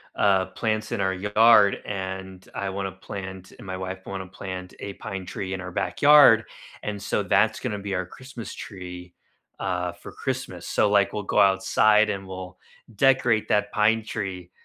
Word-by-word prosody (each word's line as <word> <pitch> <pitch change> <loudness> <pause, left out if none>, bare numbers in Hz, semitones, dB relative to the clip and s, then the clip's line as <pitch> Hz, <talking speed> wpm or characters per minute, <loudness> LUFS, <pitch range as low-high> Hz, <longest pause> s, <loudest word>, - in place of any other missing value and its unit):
uh, 95 -2 +3
plants 110 +3 -2
in - - -1
our 95 0 +1
yard, 105 +1 +5
and 95 -1 -6
I 100 -1 -3
wanna 95 0 -3
plant, 95 0 -8
and - - -12
my 95 -1 -5
wife 95 0 -6
want 95 -1 -5
to 95 +1 -16
plant 90 -1 -6
a 100 - -6
pine 95 -4 -6
tree 95 +1 -5
in 95 - -4
our 90 0 -7
backyard, 145 -2 +6 0.4
and 105 -2 -4
so - - -1
that's - - +2
gonna 105 -1 -3
be 100 -1 -3
our 90 0 -1
Christmas 130 +2 -9
tree, 90 -2 -9 0.5
uh, 90 -2 -2
for - - -12
Christmas, - - -5
so 105 - +2
like 100 -1 +3
we'll 105 -1 -3
go - - +1
outside 105 +2 +4
and 95 -1 -5
we'll 95 -1 -8 0.4
decorate 125 -2 +3
that 105 0 +1
pine 110 +1 +2
tree, 95 -5 -5
95 Hz, 175 wpm, -25 LUFS, 95-105 Hz, 0.5 s, backyard